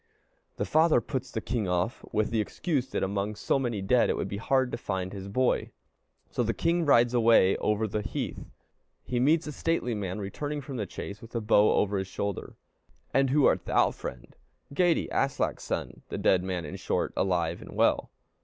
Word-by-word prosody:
The - - -1
father 160 -3 +4
puts 130 +3 -4
the 110 - -4
king 115 -5 -2
off 90 +6 -1
with 110 0 0
the 115 -2 +2
excuse 135 - -2
that - - -2
among 100 +2 -1
so 135 - 0
many 120 -7 -2
dead 120 +5 +3
it - - 0
would - - -2
be 100 - -4
hard 130 +3 +1
to - - -3
find 95 -3 -3
his 100 -1 -7
boy. 125 +5 +1 0.6
So - - -1
the 115 -1 0
king 170 +1 +1
rides 120 -3 +5
away 115 -5 +5
over 105 +1 0
the 105 +1 -2
heath. - - -5 0.5
He 125 - -2
meets 155 +6 +3
a 150 - -4
stately 150 -5 -1
man 100 -3 -3
returning 145 +9 -4
from 135 -1 -6
the 105 -4 -3
chase, 100 +3 -7
with 115 +1 -12
a - - +1
bow 105 -1 +4
over 100 -1 +1
his 95 - -3
shoulder. 100 0 -4 0.6
"And 135 -1 +3
who 140 +1 +4
art - - +3
thou, - - +3
friend?" 65 -1 -8 0.4
"Geyti, 175 +1 +2
Aslak's 135 0 0
son." - - -4
The - - -4
dead 95 - +3
man, 90 -3 -3
in 75 - -6
short, - - -1
alive 85 -3 0
and - - -10
well. - - +2
110 Hz, 200 wpm, -28 LUFS, 100-130 Hz, 0.6 s, rides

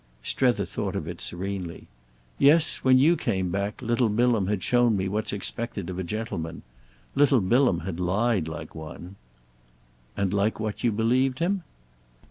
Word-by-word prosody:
Strether 120 - +1
thought - - -4
of - - -3
it - - -6
serenely. 90 -1 -5 0.5
"Yes; 155 +3 +5
when 130 -1 +4
you 155 +7 +5
came 95 - -1
back 100 +2 -3
little 120 0 +1
Bilham 115 -2 +2
had 100 -2 -1
shown 120 -3 +3
me 95 0 -1
what's 105 +3 -2
expected 100 -2 -4
of 90 - -5
a - - -2
gentleman. 85 -5 -5 0.5
Little 140 -2 +4
Bilham 115 -1 +2
had 90 -1 -5
lied 95 0 +1
like 80 -1 -7
one." 85 +4 -9 1.0
"And 100 -1 0
like 100 +2 +1
what 110 +1 -4
you 120 - +3
believed 125 +5 +1
him?" 185 +5 0
105 Hz, 155 wpm, -26 LUFS, 95-120 Hz, 1.0 s, Yes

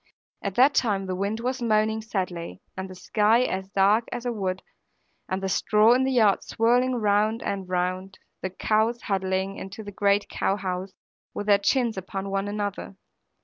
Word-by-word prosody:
At 200 -1 -4
that 270 +3 +5
time 205 -7 +1
the 185 -1 -3
wind 200 +4 -2
was 255 +1 -2
moaning 220 -1 +1
sadly, 185 -6 -4
and 190 0 -5
the 185 - -9
sky 215 +5 +2
as 190 -5 -3
dark 200 +4 +3
as 245 0 -5
a 245 - 0
wood, 190 -3 -3 0.7
and 190 +1 -2
the - - 0
straw 215 +4 +4
in 260 +1 +2
the 265 - 0
yard 220 -6 +3
swirling 245 +3 +2
round 215 0 +1
and 195 -2 -3
round, 185 +1 -2
and - - -38 0.2
the 185 - -2
cows 220 +2 +1
huddling 190 0 -1
into 200 +3 -8
the 205 - -8
great 200 +1 +2
cowhouse, 190 -1 -2 0.4
with 205 - -3
their 205 -1 +5
chins 235 +1 +1
upon 195 +1 -5
one 195 +1 -1
another. 205 -1 -4
200 Hz, 180 wpm, -25 LUFS, 190-220 Hz, 0.7 s, that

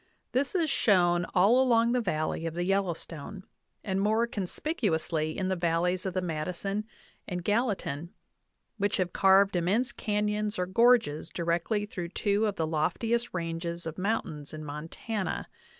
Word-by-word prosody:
This 270 +7 0
is 335 -3 +2
shown 180 - +3
all 210 +8 +5
along 235 -2 +4
the 250 0 +2
valley 160 -4 -1
of 165 - -5
the 175 - -1
Yellowstone, 185 -2 -2 0.4
and 195 -1 -1
more 220 +3 +3
conspicuously 180 - -2
in 190 - -1
the 190 - +1
valleys 175 +2 0
of 185 - -4
the 185 - 0
Madison 180 +5 -3 0.4
and 180 -2 -4
Gallatin, 200 - -1 0.7
which 205 0 +1
have 180 -2 -1
carved 195 0 +5
immense 195 +9 +1
canyons 210 0 -1
or 180 - 0
gorges 190 -6 +3
di 170 - -4
rectly 175 +5 0
through 180 -4 -5
two 205 +3 +1
of 205 - -2
the 160 - 0
loftiest 180 +10 0
ranges 170 0 -3
of 160 +2 -5
mountains 160 -8 -2
in 155 0 -7
Mon 150 +2 -6
tana. 210 +2 -3
185 Hz, 155 wpm, -29 LUFS, 170-210 Hz, 0.7 s, all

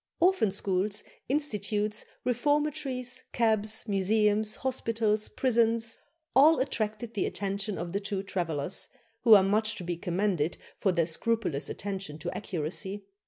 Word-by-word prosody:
Orphan 355 - +3
schools, 195 +1 0 0.3
institutes, 215 -7 0 0.2
reformatories, 270 0 0
cabs, 220 -1 +1
museums, 210 +2 +2
hospitals, 225 -4 0
prisons 230 -2 +1 0.4
all 300 +5 +7
attracted 225 -3 -2
the 200 - 0
attention 200 0 -3
of 170 0 -5
the 200 - +1
two 200 -1 -3
travellers, 175 -3 -2 0.4
who 225 -2 +10
are 195 - +6
much 215 +3 +1
to - - -6
be 175 -1 -3
commended 175 -2 0 0.2
for 195 - +2
their 170 -2 +2
scrupulous 170 -3 0
attention 195 -6 -5
to 175 +3 -5
accuracy. 190 +3 -4
210 Hz, 125 wpm, -29 LUFS, 190-230 Hz, 0.4 s, who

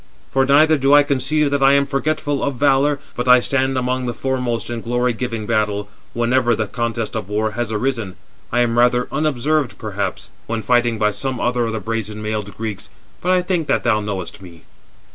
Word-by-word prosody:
For 135 0 +2
neither 155 +2 +5
do 135 +2 +5
I 145 - +7
conceive 140 +1 0
that 140 -1 0
I 135 +1 +6
am 140 0 +4
forgetful 145 +1 -1
of 140 -2 -1
valour, 140 +2 +2 0.2
but 125 +1 -3
I 125 0 +8
stand 135 +1 0
among 130 0 -1
the 120 - -3
foremost 125 -3 -2
in 115 -1 -4
glory 120 +1 0
giving 115 -2 -4
battle, 105 -2 -1 0.3
whenever 120 0 +2
the 110 - -1
contest 115 0 -3
of 90 - -4
war 105 +1 0
has 115 +1 -3
arisen. 110 -4 -2 0.4
I 120 - +2
am 120 0 +1
rather 125 0 +3
unobserved 150 -1 0
perhaps, 100 -3 -4 0.2
when 115 -1 -3
fighting 120 0 +2
by 105 -1 +2
some 130 +4 -3
other 120 -1 0
of 115 - -3
the 110 - -2
brazen 110 0 -4
mailed 105 -2 -4
Greeks; 110 -3 -5 0.3
but 180 - 0
I 180 -1 +3
think 175 -4 -1
that - - +1
thou 105 - +2
knowest 100 -3 -5
me." 85 -3 -13
120 Hz, 200 wpm, -20 LUFS, 110-135 Hz, 0.4 s, I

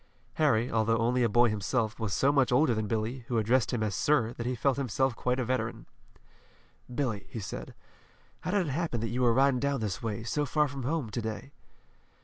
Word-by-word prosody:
Harry, 125 -6 +3
although 115 0 +2
only 120 +2 +1
a 120 - +3
boy 120 +3 +5
himself, 110 +2 -1
was 110 -3 -2
so 135 +8 +3
much 135 -4 +2
older 125 +1 +4
than 110 -1 -2
Billy, 110 +4 -2
who 120 - -1
addressed 115 +2 +2
him 120 -3 -1
as 105 -2 -1
"sir," 120 -4 +2
that 115 0 -5
he 125 - -1
felt 135 +3 +1
himself 130 -1 0
quite 125 +2 -1
a 125 - 0
veteran. 130 +2 -2 1.1
"Billy," 120 -6 -2
he 115 - -6
said, 95 - -7 0.6
"how - - -5
did 195 -1 +2
it 145 - -3
happen 155 -4 -1
that 115 +1 -2
you 125 +2 -2
were 120 -1 +4
riding 130 +1 +3
down 140 0 0
this 105 -4 -3
way, 110 -1 -3
so 145 +6 -1
far 150 +2 +1
from 140 0 -6
home, 135 -3 -2
to 120 - -2
day?" 110 +5 -5
120 Hz, 215 wpm, -29 LUFS, 110-135 Hz, 1.1 s, boy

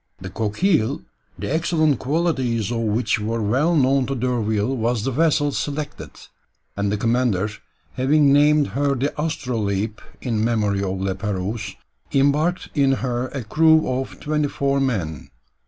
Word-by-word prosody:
The 95 0 -8
Coquille, 115 - 0 0.3
the - - -3
excellent 155 -4 +1
qualities 130 - 0
of 120 - -1
which 115 +1 0
were 115 +2 -2
well 130 +11 +1
known 135 -2 +3
to 135 - -2
D'Urville, 120 -1 0
was 115 -2 -1
the 135 - -1
vessel 145 0 +2
selected; 145 +1 -4 0.7
and 100 0 -1
the 105 - 0
commander 115 -3 +1 0.4
having 140 +2 +3
named 150 -1 +4
her 140 +6 0
the 135 +3 -1
Astrolabe 110 -9 -2 0.2
in 115 -4 -1
memory 105 -4 +1
of 95 -1 -2
La 95 0 -1
Pérouse, 100 +2 -4 0.4
embarked 145 +6 +2
in 140 -2 +3
her 125 0 -1
a 135 -1 -5
crew 160 +7 +4
of 130 +1 -3
twenty 150 0 0
four 140 0 0
men. 95 - -2
125 Hz, 145 wpm, -22 LUFS, 110-145 Hz, 0.7 s, named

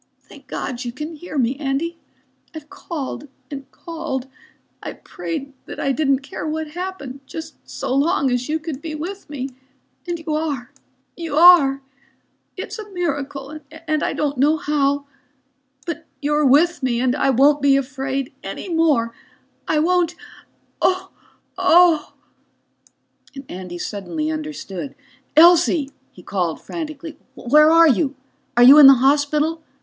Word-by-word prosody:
"Thank - - -16
God 250 0 -4
you 240 - -4
can 300 +6 -7
hear 310 0 -8
me, 250 0 +1
Andy. 305 +4 -2 0.6
I've 305 +1 -10
called 300 -7 -6 0.2
and 275 -2 -7
called. 315 -6 -5 0.6
I - - -6
prayed 280 -4 -6
that - - -8
I 275 - 0
didn't 275 -1 +1
care 280 - -6
what 310 0 -3
happened, 340 -6 -6
just 320 - -7 0.2
so - - -3
long 275 -1 +2
as 245 +2 -1
you 315 - +1
could 310 -3 -7
be 315 -1 -5
with 365 +5 -7
me. 275 -2 -5 0.6
And 345 -1 -2
you 320 -1 -4
are, 290 -5 -3 0.4
you 330 -4 -5
are. 290 -6 +7 0.7
It's - - -6
a 420 -1 -8
miracle 285 -5 -4
and 315 -1 -3
I - - -1
don't 285 -3 -2
know 300 +4 +3
how. 285 -1 0 0.8
But 335 -1 -6
you're 295 +1 +1
with 320 +6 +4
me 245 -3 0
and 250 0 +1
I 275 - +1
won't 280 +3 +4
be 275 -1 +4
afraid 270 0 -3
any - - -6
more. 300 -9 +2 0.5
I 315 - +1
won't... 350 +2 +2 0.7
oh... 375 0 +1 0.5
oh 335 -3 +4 0.6
..." 275 -1 -17
Andy 180 -1 -7
suddenly 305 - -4
understood. 300 - -6 0.4
"Elsie," 330 -3 +5 0.2
he 180 - -16
cried 175 -5 -2
frantically. 315 -1 -7 0.2
"Where 300 +5 +5
are 330 +1 +7
you? 280 0 +1 0.4
Are 240 - +7
you 275 +4 +10
in 285 - +11
the 270 - +9
hospital? 295 +4 +1
295 Hz, 145 wpm, -21 LUFS, 270-325 Hz, 0.8 s, in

